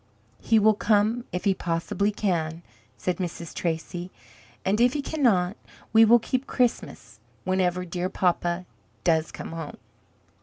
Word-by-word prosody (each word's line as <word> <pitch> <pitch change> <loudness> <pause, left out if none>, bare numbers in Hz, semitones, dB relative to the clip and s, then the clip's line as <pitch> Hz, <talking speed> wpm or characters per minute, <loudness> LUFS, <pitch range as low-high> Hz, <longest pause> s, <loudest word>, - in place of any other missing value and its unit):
"He 225 - +3
will 215 0 +5
come 215 +3 +2
if 180 - -3
he 200 - +4
possibly 180 +4 -1
can," 170 -5 -1 0.3
says 180 - -2
Mrs. 170 -3 -5
Tracy; 175 +1 -3 0.6
"and 205 +4 +2
if 245 +1 +4
he 295 - -1
cannot, 215 - +1 0.4
we 225 0 +8
will 235 +2 +7
keep 255 +3 -2
Christmas 250 -2 -1 0.2
whenever 180 -1 0
dear 180 +1 -3
papa 175 -1 0 0.4
does 160 -2 +2
come - - -7
home." 165 -2 -6
185 Hz, 140 wpm, -26 LUFS, 175-220 Hz, 0.6 s, we